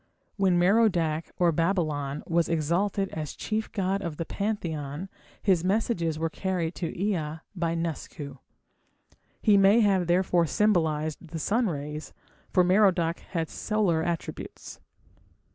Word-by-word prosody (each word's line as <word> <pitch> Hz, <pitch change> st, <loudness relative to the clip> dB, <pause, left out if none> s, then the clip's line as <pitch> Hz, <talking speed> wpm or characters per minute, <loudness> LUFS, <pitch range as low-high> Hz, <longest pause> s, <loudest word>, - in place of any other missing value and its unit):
When 190 Hz, -3 st, +3 dB
Merodach 175 Hz, -5 st, +2 dB
or 175 Hz, -1 st, +4 dB
Babylon 155 Hz, -4 st, -1 dB
was 170 Hz, 0 st, +1 dB
exalted 175 Hz, +5 st, 0 dB
as 155 Hz, -2 st, -5 dB
chief 220 Hz, 0 st, -3 dB
god 195 Hz, -1 st, -1 dB
of 170 Hz, -5 st, -4 dB
the 165 Hz, -, -3 dB
pantheon 170 Hz, -6 st, -3 dB, 0.3 s
his 185 Hz, -5 st, +3 dB
messages 185 Hz, -5 st, 0 dB
were 165 Hz, +1 st, 0 dB
carried 180 Hz, -3 st, -2 dB
to 170 Hz, -2 st, -3 dB
Ea 165 Hz, -6 st, -1 dB
by 170 Hz, -2 st, -1 dB
Nusku. 150 Hz, -4 st, -5 dB, 1.0 s
He 210 Hz, -2 st, +6 dB
may 200 Hz, +4 st, +6 dB
have 190 Hz, -4 st, +3 dB
therefore 175 Hz, -1 st, +3 dB
symbolized 160 Hz, -7 st, +1 dB
the 160 Hz, -, -6 dB
sun 225 Hz, +9 st, +1 dB
rays, 150 Hz, -2 st, -5 dB, 0.4 s
for 180 Hz, -, +4 dB
Merodach 180 Hz, -3 st, +3 dB
had 165 Hz, -3 st, -3 dB
solar 200 Hz, -6 st, 0 dB
attributes. 170 Hz, 0 st, -5 dB
170 Hz, 125 wpm, -27 LUFS, 160-195 Hz, 1.0 s, He